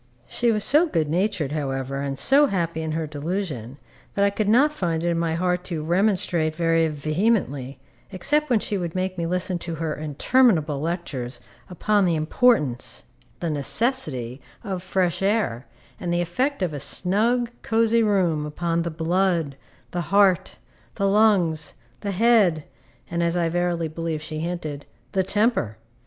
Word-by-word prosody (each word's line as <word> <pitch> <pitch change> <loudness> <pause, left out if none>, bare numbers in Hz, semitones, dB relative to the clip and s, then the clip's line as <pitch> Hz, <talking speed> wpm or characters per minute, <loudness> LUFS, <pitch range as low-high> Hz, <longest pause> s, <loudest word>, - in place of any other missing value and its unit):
She 240 -1 +1
was 210 -2 +1
so 310 +5 +5
good 160 - 0
natured, 175 -4 0
however, 135 -2 -3
and 140 -1 -3
so 285 - +4
happy 170 - -2
in 160 -1 -3
her 160 0 -1
delusion, 150 - -4 0.4
that 200 - +3
I 200 - +2
could 205 0 -1
not 280 +7 +4
find 170 - -2
it 175 - +1
in 170 -1 0
my 165 -1 0
heart 180 +1 0
to 165 -4 -4
remonstrate 175 -3 +1
very 165 -1 +2
vehemently, 155 - -1 0.3
except 295 +11 0
when 240 -4 +3
she 205 -1 -2
would 170 -1 -4
make 185 0 -1
me 170 -2 -2
listen 180 0 -1
to 170 -1 -5
her 160 -1 -2
interminable 155 - +2
lectures 150 -7 -4 0.3
upon 205 +2 +1
the 170 -2 +2
importance, 155 - +1 0.4
the 170 -2 -1
necessity, 145 - 0 0.2
of 190 -5 -4
fresh 180 -1 0
air, 195 - 0 0.3
and 175 - -3
the 175 0 +1
effect 250 - -1
of 170 -4 -1
a 145 - -4
snug, 225 - 0
cosy 230 0 +2
room 185 -8 +2
upon 170 +2 -1
the 170 - -2
blood, 165 -2 0 0.4
the 175 - -2
heart, 200 -3 +3 0.4
the 200 -2 +1
lungs, 195 -7 +2 0.2
the 200 - -4
head, 200 -6 +3 0.5
and 170 0 -1
(as 170 +1 +1
I 170 -1 +1
verily 175 -1 0
believe 160 -1 -4
she 155 -1 -5
hinted) 155 -4 -4 0.2
the 190 - +1
temper. 205 - 0
175 Hz, 160 wpm, -24 LUFS, 155-200 Hz, 0.5 s, so